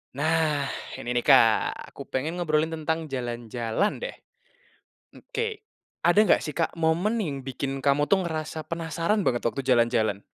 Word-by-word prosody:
Nah, 150 -2 +1 0.2
ini 120 - -5
nih, 125 - +2
Kak. 115 -6 +4
Aku - - -10
pengen 155 +7 -3
ngobrolin 160 -1 +1
tentang 160 -1 -3
jalan-jalan, 120 - -2
deh. - - -5 1.0
Oke. 450 -3 -4 0.4
Ada 175 +4 +4
nggak - - +4
sih, 150 - -5
Kak, 165 - 0
momen 170 +8 +1
yang 140 -7 -4
bikin 135 +1 -3
kamu 145 +1 +3
tuh, 190 -2 +3
ngerasa 155 -1 -4
penasaran 170 +5 -1
banget, 120 -9 0
waktu 115 +3 0
jalan-jalan? 115 -5 +2
155 Hz, 145 wpm, -26 LUFS, 130-170 Hz, 1.0 s, Kak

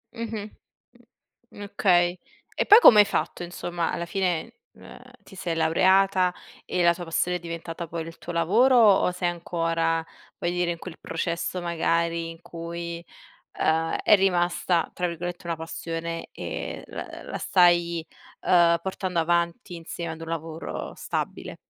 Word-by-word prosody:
Mh-mh. 220 -2 -5 1.1
Okay. 180 -3 +2 0.4
E - - 0
poi 425 - +10
come 215 - +9
hai 205 - +8
fatto, - - -2
insomma 175 -1 -3
alla 170 - -3
fine, 185 +4 -2 0.2
uhm, - - -14 0.2
ti - - -15
sei 175 -3 -3
laureata 185 +3 +3 0.3
e 180 - 0
la 170 0 +5
tua 175 0 -7
passione 180 +2 0
è - - -13
diventata 170 0 -6
poi 165 0 -5
il 165 - -10
tuo 175 - -7
lavoro 220 +11 +4
o 205 -5 +5
sei 180 0 -1
ancora, 165 -1 -1 0.3
voglio 175 - -1
dire, 175 -1 0
in 170 - -4
quel 175 -2 -9
processo 170 +1 -3
magari 170 -1 0
in 165 0 -11
cui, 170 0 -6 0.6
uhm, 160 +1 +1
è 210 - +6
rimasta 175 -2 +1
tra 180 - -1
virgolette, 175 +1 -6
"una 170 -1 -2
passione" 165 +1 -5
e - - -5
la - - -6 0.2
l - - -12
la - - -3
stai, 175 -2 +3 0.4
uhm, 170 -1 +4
portando 185 -1 -3
avanti 170 +1 0
insieme 170 0 -6
ad 160 - -9
un 165 - -7
lavoro 165 0 -5
stabile? - - -4
170 Hz, 150 wpm, -25 LUFS, 165-180 Hz, 1.1 s, poi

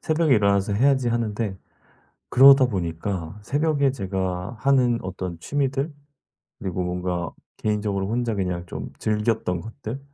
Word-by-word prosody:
새벽에 155 -3 +2
일어나서 100 -1 +2
해야지.' 130 +3 +3
하는데 110 -3 -1 0.7
그러다 135 0 +8
보니까 90 -2 -3
새벽에 145 +2 +1
제가 95 -1 -3
하는 125 -2 +3
어떤 95 -2 -5
취미들 140 - -1 0.7
그리고 95 -2 -3
뭔가 90 -1 -2 0.3
개인적으로 105 -2 -1
혼자 120 0 -1
그냥 90 -3 -2
좀 - - -6
즐겼던 105 -4 0
것들 115 +4 -7
105 Hz, 300 characters per minute, -24 LUFS, 95-130 Hz, 0.7 s, 그러다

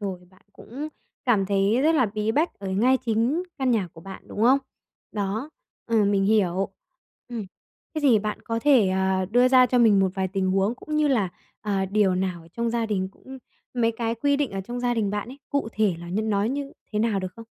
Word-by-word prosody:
rồi 190 -3 -4
bạn 185 - -24
cũng 280 +10 -7 0.4
cảm 215 -7 +2
thấy 200 +4 +2
rất 320 +2 +4
là 255 -7 +3
bí 215 +1 -2
bách 315 +8 +1
ở 200 -1 -5
ngay 230 +8 +3
chính 235 +9 +1 0.2
căn 265 -2 +1
nhà 210 -6 +1
của 160 - -13
bạn, 190 +3 -9
đúng 210 - -4
không? 260 +4 +6 0.5
Đó, 210 +7 -3 0.4
ừ, 225 -3 +3
mình 200 -1 +2
hiểu. 195 -2 +2 0.6
Ừm. 230 -4 -5 0.5
Thế 310 - -1
thì 260 -7 +5
bạn 210 0 -4
có 230 0 -2
thể, 260 -9 +5
ờ, 190 0 +1
đưa 245 +3 +5
ra 255 -1 +6
cho 250 0 +1
mình 215 -4 +5
một 190 -1 +2
vài 190 -2 -1
tình 190 0 -1
huống 195 +4 +1
cũng 305 +4 -5
như 305 -1 +3
là, 220 -9 +2 0.3
ờ, 200 -2 -1
điều 195 -1 +2
nào 180 -2 -2
ở 165 - -17
trong 235 +6 -2
gia 230 -1 0
đình 190 -3 -1
cũng 265 +5 -12 0.4
mấy 230 -2 +2
cái 230 0 -2
quy 285 +4 +1
định 285 -3 -1
ở 195 - -4
trong 240 +6 -5
gia 245 0 +1
đình 215 -4 0
bạn 205 +2 -3
ấy, 265 +3 -10
cụ 280 -5 -1
thể 210 -4 +1
là 170 - -9
như 195 +5 -1
nó 205 -2 +1
như 275 +4 -3 0.2
thế 210 - 0
nào 215 -3 +1
được 185 -1 -5
không? 230 - -10
215 Hz, 230 wpm, -25 LUFS, 195-245 Hz, 0.6 s, không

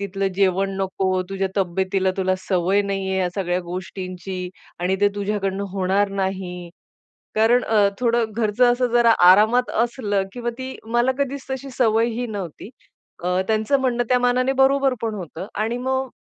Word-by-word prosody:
तिथलं 195 0 -2
जेवण 195 0 +2
नको, 190 -1 -1
तुझ्या 195 0 -2
तब्येतीला 190 +1 0
तुला 185 -1 +1
सवय 185 +1 +1
नाहीये 195 -1 -2
ह्या 185 -1 +1
सगळ्या 180 -2 -1
गोष्टींची 185 +1 -6 0.3
आणि 185 +2 +1
ते 205 - +5
तुझ्याकडून 200 -1 -2
होणार 195 +1 +1
नाही," 180 -2 -4 0.6
कारण 230 +3 +4
अ, 210 -2 +3
थोडं 235 -2 +1
घरचं 235 +2 +3
असं 250 +1 +1
जरा 240 -1 +5 0.2
आरामात 220 +6 +4
असलं 210 -5 -1
किंवा 240 -1 -3
ती 260 0 -6 0.2
मला 245 +2 +3
कधीच 280 0 -2
तशी 265 +1 -4
सवयही 230 +1 +2
नव्हती. 200 -2 -7 0.5
अ, 180 +1 +1
त्यांचं 220 +5 +2
म्हणणं 245 -2 0
त्या 250 -1 +4
मानाने 250 +1 +2
बरोबर 270 0 +3
पण 225 -2 -1
होतं 180 -1 -7 0.2
आणि 230 +2 -1
मग 260 +1 -1
205 Hz, 150 wpm, -22 LUFS, 190-240 Hz, 0.6 s, ते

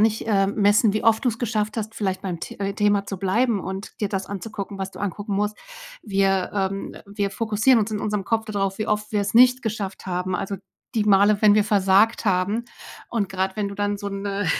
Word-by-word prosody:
nicht, 220 0 +2
ähm, 200 -2 +2
messen, 205 +1 +4
wie 215 - -1
oft 225 -1 +4
du's 230 -2 0
geschafft 215 -2 -1
hast, 220 0 -4
vielleicht 190 -3 -2
beim 180 -3 -3
The - - -7
äh, 195 0 -1
Thema 205 -1 +2
zu 195 - -5
bleiben 205 +3 +1
und 190 +2 -7
dir 205 - 0
das 190 -1 -2
anzugucken, 200 0 -6
was 190 0 -4
du - - -11
angucken 205 +1 -3
musst. 210 +1 0 0.5
Wir 195 -2 +1
ähm, 195 0 -2
wir 200 -1 -2
fokussieren 225 +3 +2
uns 210 - -1
in 210 - -1
unserem 210 -2 -2
Kopf 225 +1 0
da 215 - -6
drauf, 195 -1 -1
wie 215 - -2
oft 210 0 -1
wir's 205 0 0
nicht 250 +2 +6
geschafft 205 -4 -4
haben, 180 0 -2
also, 195 0 -3 0.4
die 215 - +2
Male, 205 0 +4
wenn 210 -1 +7
wir 210 - +4
versagt 205 +2 +3
haben. 200 +4 +1 0.5
Und 215 -5 -1
grad 190 0 -1
wenn 205 -1 -1
du 200 - -7
dann 205 0 -1
so 200 - -4
'ne 200 0 -3
205 Hz, 220 wpm, -23 LUFS, 195-215 Hz, 0.5 s, wenn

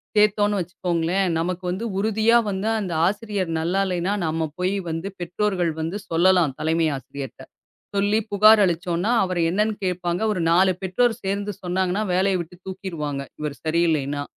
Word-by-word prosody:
சேத்தோம்னு 210 -1 +3
வச்சுக்கோங்களேன். 180 +1 -1
நமக்கு 180 +2 -2
வந்து 195 +6 -3
உறுதியா 220 +3 +3
வந்து 195 +2 -1
அந்த 185 -5 -3
ஆசிரியர் 205 -3 -2
நல்லா 175 +4 0
இல்லைன்னா, 180 +1 -1
நாம 160 0 -1
போய் 185 +2 0
வந்து 165 +3 -3
பெற்றோர்கள் 180 0 -1
வந்து 165 +5 -3
சொல்லலாம். 170 -3 +3
தலைமை 160 +1 +1
ஆசிரியர்ட்ட. 135 0 -8 0.5
சொல்லிப் 205 +2 +1
புகார் 215 +1 +7
அளிச்சோம்னா, 175 +3 0
அவர் 185 -2 -2
என்னன்னு 210 +4 +1
கேப்பாங்க. 180 0 -1
ஒரு 185 - -2
4 185 +2 +5
பெற்றோர் 225 +6 +2
சேர்ந்து 200 +1 -2
சொன்னாங்கன்னா, 185 +3 0
வேலைய 190 +1 +2
விட்டு 170 +1 -10
தூக்கிருவாங்க, 165 -7 -4 0.2
இவர் 150 -2 -3
சரியில்லைன்னா. 155 -4 +1
185 Hz, 140 wpm, -23 LUFS, 170-200 Hz, 0.5 s, புகார்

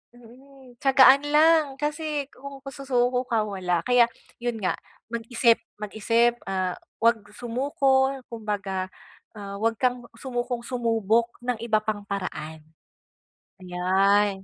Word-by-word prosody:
mm, 250 +1 -17
tiyagaan 270 0 +6
lang 315 +1 +5
kasi 300 -1 -2
kung 275 +1 -10
susuko 250 -2 0
ka 225 -2 +1
wala, 180 -4 -1
kaya 245 -1 +5 0.3
yun 240 -1 -2
nga - - +2 0.4
mag-isip 235 0 +2 0.2
mag-isip, 230 +3 +1
ah, 185 -1 -1 0.3
'wag 230 -1 +5 0.2
sumuko 265 +2 +1 0.2
kumbaga, 205 -4 -3 0.5
ah, 200 0 -7
'wag 225 +1 +1
kang 250 -1 0
sumukong 245 -1 -3
sumubok 230 -2 +1
ng 245 -2 -2
iba 225 -2 +2
pang 215 -1 -3
paraan. 160 -6 -5 1.0
Ayan. 190 +2 +2
235 Hz, 110 wpm, -25 LUFS, 205-260 Hz, 1.0 s, tiyagaan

